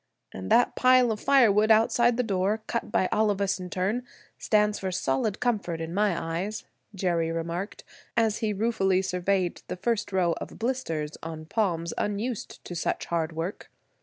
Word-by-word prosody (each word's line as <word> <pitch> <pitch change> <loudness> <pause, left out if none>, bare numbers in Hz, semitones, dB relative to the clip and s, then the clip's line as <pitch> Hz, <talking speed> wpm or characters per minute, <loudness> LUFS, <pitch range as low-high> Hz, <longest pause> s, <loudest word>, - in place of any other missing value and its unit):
"And 95 0 -7
that 245 - +4
pile 255 -2 +5
of 215 - -3
firewood 220 -6 +4
outside 230 +2 +4
the 250 - +2
door, 205 +1 0
cut 235 - -3
by 185 - +2
all 215 0 +3
of 200 -1 0
us 195 -1 0
in 180 0 -6
turn, 195 +7 -1 0.4
stands 210 -1 +2
for 190 -1 -3
solid 180 +4 -1
comfort 205 -9 -1
in 165 +1 -5
my 200 -2 +1 0.2
eyes," 210 +4 -4 0.3
Jerry 170 -3 0
remarked, 170 +4 -4 0.3
as 225 -2 +2
he 220 -2 0
ruefully 195 -3 +1
surveyed 185 0 0
the - - -4
first 230 +2 -1
row 180 -3 +2
of - - -7
blisters 190 - -2
on 160 -1 -7
palms 170 -3 -1
unused 210 +3 -3
to - - -6
such 170 - -2
hard 165 -1 -1
work. 170 +6 -5
195 Hz, 170 wpm, -27 LUFS, 175-220 Hz, 0.4 s, pile